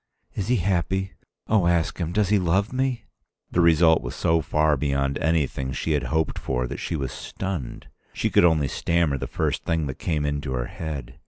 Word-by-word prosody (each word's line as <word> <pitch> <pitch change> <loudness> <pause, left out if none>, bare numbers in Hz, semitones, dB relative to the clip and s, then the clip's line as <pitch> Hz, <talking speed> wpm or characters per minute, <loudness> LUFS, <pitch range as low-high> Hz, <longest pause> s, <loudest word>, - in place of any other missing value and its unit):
"Is 100 -2 -3
he 125 - +3
happy? 95 -1 0 0.3
Oh, 105 -5 +3
ask 85 0 +1
him 85 -1 -2
does 105 0 +1
he 105 -1 +4
love 95 +6 +1
me?" 130 -1 -1 0.5
The 90 - +2
result 80 -1 +5
was - - -6
so 80 0 +2
far 75 0 +2
beyond 70 -1 0
anything 70 -4 0
she 80 - -2
had 75 -3 +1
hoped 80 0 -1
for 60 -1 -1
that - - -5
she - - -3
was 70 -3 -3
stunned. 90 -4 -5 0.3
She - - -1
could - - +5
only 80 -5 +4
stammer 85 -2 0
the - - -4
first - - -1
thing 80 -2 0
that 65 -2 -5
came 75 -3 -1
into 70 -2 -2
her - - -1
head. 70 -6 -6
80 Hz, 195 wpm, -24 LUFS, 70-90 Hz, 0.5 s, result